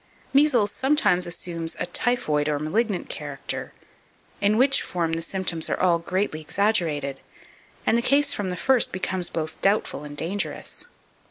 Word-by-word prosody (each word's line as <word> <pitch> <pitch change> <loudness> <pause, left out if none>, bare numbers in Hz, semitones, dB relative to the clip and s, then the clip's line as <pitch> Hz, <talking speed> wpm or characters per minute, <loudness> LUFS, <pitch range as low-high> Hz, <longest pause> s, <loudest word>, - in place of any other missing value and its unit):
Measles 265 -8 +4
sometimes 265 - +2
assume 170 -1 -3
a - - -2
typhoid 175 -7 0
or 150 - +1
malignant 195 +6 -1
character, 145 -3 -5 0.7
in 205 +2 +3
which 270 +2 +4
form 170 -2 -2
the 165 - -1
symptoms 170 -2 -2
are - - -1
all 175 -2 +3
greatly 180 -2 -2
exaggerated, 155 -7 0 0.7
and - - +3
the - - 0
case 280 +4 +3
from 200 -2 -3
the 180 - -4
first 260 +5 +3
becomes 185 -1 -2
both 155 -1 -4
doubtful 195 -7 +1
and 145 0 -9
dangerous. 170 -1 -3
180 Hz, 150 wpm, -25 LUFS, 160-215 Hz, 0.7 s, Measles